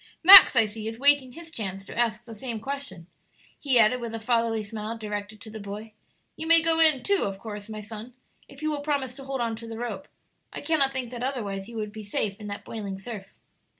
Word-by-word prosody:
Max, 375 -4 +11
I 230 -2 +5
see, 215 +1 -7
is 225 0 -5
waiting 280 -1 +3
his 330 +2 -10
chance 195 -7 -5
to - - -9
ask 235 -1 0
the 230 - -10
same 225 +1 -5
question," 270 -8 -6 0.5
he 270 -4 +1
added, 235 +2 +4
with 230 -1 -5
a - - -4
fatherly 230 -1 0
smile 215 +2 -6
directed 210 -1 -6
to 220 - -10
the 220 - -8
boy; 210 +2 -8 0.4
"you 320 - -6
may 330 0 +8
go 325 0 +2
in 310 -6 +4
too, 400 -1 +1
of 195 -1 -4
course, 205 0 -8
my 215 -1 -6
son, 220 +3 -9 0.3
if 275 +2 -13
you 310 - 0
will 290 -1 -3
promise 285 -4 -2
to 270 +1 -11
hold 270 -2 -3
on 230 -1 -1
to 230 0 -9
the 225 -1 -7
rope. 225 -5 -5 0.4
I - - -6
cannot 295 -4 +2
think 255 -3 -4
that 240 -1 -7
otherwise 210 -6 -3
you 235 - -8
would 210 -1 -4
be 215 0 -8
safe 205 -1 -2
in 210 - -8
that 200 0 -7
boiling 200 -4 -6
surf." 195 -1 -9
230 Hz, 235 wpm, -26 LUFS, 210-270 Hz, 0.5 s, Max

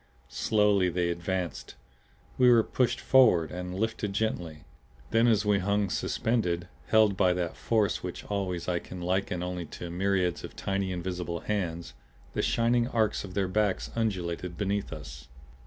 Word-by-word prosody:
Slowly 100 +4 +2
they 90 0 0
advanced. 85 -4 -3 0.6
We 125 -1 +7
were 115 -2 +6
pushed 125 +2 0
forward 110 -12 +4
and 90 0 -5
lifted 110 -2 -1
gently. 90 -8 -2 0.5
Then 115 +1 +4
as 110 -3 +3
we 105 -1 +3
hung 100 0 0
suspended, 90 -7 0 0.2
held 110 -3 +4
by 90 -1 +3
that 90 -2 -2
force 110 -4 +1
which 90 -1 -6
always 95 -4 -3
I 90 -1 +1
can 90 - -9
liken 90 0 -1
only 90 -2 -4
to 85 -1 -6
myriads 90 -1 0
of - - -8
tiny 95 -1 -2
invisible 90 -1 -4
hands, 85 -5 -3 0.4
the - - 0
shining 120 +1 +2
arcs 110 -4 0
of 90 -2 -9
their 100 -2 +1
backs 100 0 0
undulated 90 -6 -2
beneath 100 0 -1
us. 65 -5 -9
95 Hz, 155 wpm, -28 LUFS, 90-105 Hz, 0.6 s, We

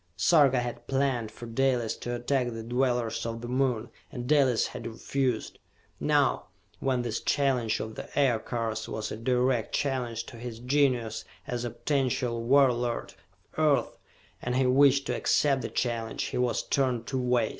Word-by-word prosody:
Sarka 140 -6 +5
had 120 -1 -6
planned 135 -4 0
for 120 - -10
Dalis 120 -1 0
to 120 0 -4
attack 125 +1 0
the 115 -1 -6
dwellers 120 -1 0
of 115 0 -4
the 120 - -6
Moon, 125 -2 0 0.2
and 125 -4 -5
Dalis 135 -5 +4
had - - -7
refused. 125 +1 -2 0.4
Now, - - +2 0.3
when 130 -2 0
this 120 -2 -2
challenge 125 -6 +1
of 110 0 -5
the - - -8
Aircars 115 -4 0
was 110 0 -4
a - - -3
direct 125 0 +1
challenge 125 -5 -1
to 120 - -11
his 120 -1 -6
genius 125 -3 +1 0.2
as 120 -1 -3
a - - -2
potential 125 -2 -1
warlord 125 -2 +2 0.4
of - - -21
earth 150 -3 +2 0.4
and 125 0 -2
he 130 0 +3
wished 140 +1 +5
to - - -1
accept 140 -3 +2
the - - -4
challenge, 115 -2 -2
he - - -3
was 125 -1 +1
torn 130 -4 0
two 130 +2 -2
ways. 125 -2 +2
125 Hz, 165 wpm, -28 LUFS, 115-135 Hz, 0.4 s, Sarka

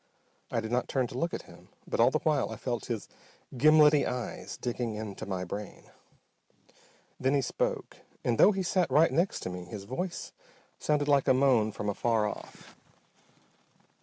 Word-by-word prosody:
I 115 - -1
did 110 0 -6
not 125 +1 0
turn 130 -2 0
to 120 - -7
look 170 +3 0
at - - -5
him - - -16 0.2
but - - -3
all 120 +2 +6
the 155 - +1
while 150 -2 +1
I - - -5
felt 120 -3 -3
his 115 -5 -4 0.5
gimlety 150 +2 +6
eyes 125 -1 -5
digging 120 -2 -3
into 105 -3 -6
my 95 -2 -2
brain. 100 +3 -7 1.3
Then 130 +2 +2
he 140 - +3
spoke. 125 - -2 0.3
And 115 -2 0
though 210 - +8
he 195 -2 -2
sat 180 -1 +1
right 150 +5 +4
next 175 +4 +1
to 90 - -4
me 90 0 -6
his 95 +3 -8
voice 170 - -4 0.5
sounded 150 -1 +1
like 140 -2 +3
a 130 - +5
moan 125 -5 +3
from 105 - -5
afar 110 +1 +1
off. - - -9
125 Hz, 175 wpm, -29 LUFS, 110-150 Hz, 1.3 s, though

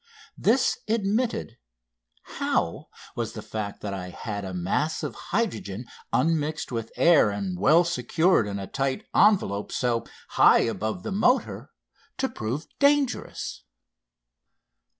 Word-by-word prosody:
This 240 +6 +2
admitted, 215 - -1 0.6
how - - -2 0.3
was 115 -2 -3
the 110 - -7
fact 105 -2 -5
that 100 -1 -4
I 90 -2 -5
had 100 +2 -5
a 95 - -5
mass 95 - -1
of - - -3
hydrogen 115 - -3 0.3
unmixed 155 -2 0
with 115 -2 -4
air 165 -10 +5
and 100 -2 -3
well 160 - +5
secured 165 - +2
in 100 -1 -3
a 100 - -5
tight 135 +5 -2
envelope 180 - +3
so 120 -2 0 0.3
high - - +6
above 110 - -2
the 220 - -4
motor 245 +7 +1 0.5
to 265 - 0
prove 125 - -4
dangerous? 285 -2 +1
125 Hz, 125 wpm, -26 LUFS, -, 0.6 s, high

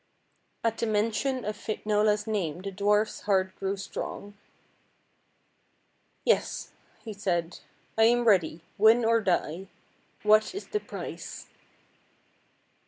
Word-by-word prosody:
At 225 -1 0
the 230 - 0
mention 225 +4 0
of 210 0 -2
Finola's 210 0 0
name 185 -6 -2
the 200 - -4
dwarf's 205 +2 +1
heart 190 -1 +2
grew 195 +1 -1
strong. 200 +1 -6 1.3
" - - -43
Yes," 485 - +1 0.3
he 220 - -5
said; 175 -4 -2 0.2
" - - -37
I 225 - +7
am 240 +1 +3
ready 175 -6 +3 0.2
win 225 +3 +6
or 230 0 +4
die. 180 -1 -1 0.6
What 215 - +4
is 400 - -7
the 420 - 0
price? - - -8
210 Hz, 120 wpm, -28 LUFS, 195-225 Hz, 1.3 s, I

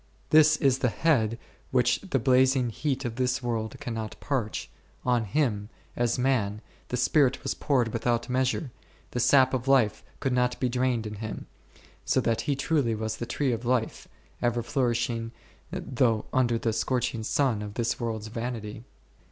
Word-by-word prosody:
This 155 0 +6
is 135 -2 +2
the 125 - +2
head 115 -6 +1 0.3
which 125 -2 +2
the 190 -9 -1
blazing 130 0 +3
heat 135 +2 -2
of 115 -1 -4
this 130 0 0
world 115 -2 -2
cannot 115 -2 -5
parch; 125 -7 -2 0.4
on 120 -2 +2
Him, 105 -3 0 0.3
as 120 0 +1
man, 115 -5 0 0.3
the 125 - -2
Spirit 135 +1 +2
was 135 - -1
poured 130 -6 +1
without 120 0 0
measure, 130 +1 0 0.4
the 120 - -2
sap 130 +2 +5
of 130 0 -2
life 125 -6 +3 0.2
could 135 - 0
not 125 0 +1
be 125 - +1
drained 125 -2 0
in 105 -1 -6
Him, 110 0 -6 0.6
so - - +2
that 115 -1 +1
He 145 - 0
truly 135 -4 +1
was 110 0 -3
the 120 - -5
Tree 140 -3 0
of 115 0 -3
Life, 120 -2 -1 0.3
ever 120 -1 +1
flourishing 120 -2 -1 0.4
though 120 -4 0
under 120 -2 +2
the 115 -1 -1
scorching 125 -1 -1
sun 115 -1 +1
of 105 -1 -7
this 120 -1 -1
world's 110 -2 -3
vanity. 115 -2 -5
120 Hz, 165 wpm, -27 LUFS, 115-130 Hz, 0.6 s, This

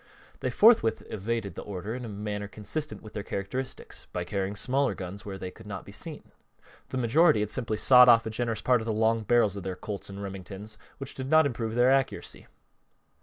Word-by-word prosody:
They - - -1
forthwith 215 - +5
evaded 110 0 -3
the - - -7
order 100 +2 -5
in 125 0 -5
a - - -6
manner 105 0 -4
consistent 110 +10 -4
with 110 - -11
their 105 - -3
characteristics 100 +7 -5
by 90 - -2
carrying 100 +2 -3
smaller 135 +6 +1
guns 95 +2 -7
where 95 -1 -5
they 95 -1 -6
could 110 +2 -14
not 100 -2 -6
be - - -11
seen. 145 +9 -8 0.6
The 130 - -3
majority 140 +3 +4
had 105 0 -1
simply 115 -4 -2
sawed 125 +1 +8
off 115 -1 +6
a 110 - -3
generous 115 -1 -2
part 125 -2 +3
of - - -6
the 115 - -1
long 110 +1 +2
barrels 110 -2 +3
of 100 - -5
their 95 0 -4
Colts 100 +2 -6
and 100 0 -8
Remingtons, 100 +2 -8 0.2
which 135 - -7
did 130 0 -5
not 160 0 +6
improve 115 -4 -2
their 125 +2 +5
accuracy. 135 -1 -1
110 Hz, 210 wpm, -28 LUFS, 100-125 Hz, 0.6 s, sawed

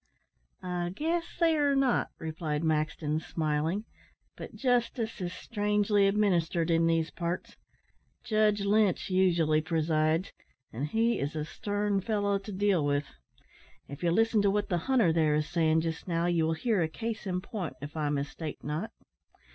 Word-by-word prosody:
"I 180 -1 -2
guess 330 +6 0
they 330 -2 +4
are 285 -2 +2
not," 270 -3 +2
replied 155 -1 -3
Maxton, 155 -1 0
smiling; 160 +5 -1 0.5
"but - - -9
justice 240 -4 0
is 175 -1 -2
strangely 205 0 +1
administered 175 -5 +1
in 165 0 +3
these 165 -1 +1
parts. 170 0 -4 0.7
Judge 215 -1 +2
Lynch 205 -2 +2
usually 170 -5 +3
presides, 160 +1 0 0.4
and 130 +6 -2
he 225 +7 +1
is 145 +3 -3
a 150 -1 -2
stern 205 +3 -1
fellow 205 -1 0
to 200 +2 -9
deal 195 -4 +2
with. 145 0 +1 0.8
If 140 +1 -9
you 175 - +2
listen 225 +4 +3
to 200 - +3
what 205 +1 0
the 175 -3 +1
hunter, 235 -11 +4
there, 155 -2 +3
is 150 0 0
saying 160 -2 +2
just 165 +2 -4
now, 170 -1 0
you 170 -2 +2
will 160 - +1
hear 205 +4 0
a 160 - +2
case 220 +4 -5
in 180 -1 -1
point, 185 - -5
if 145 +3 -8
I 150 -2 -1
mistake 145 +2 -4
not." 155 +9 -3
175 Hz, 160 wpm, -29 LUFS, 160-210 Hz, 0.8 s, they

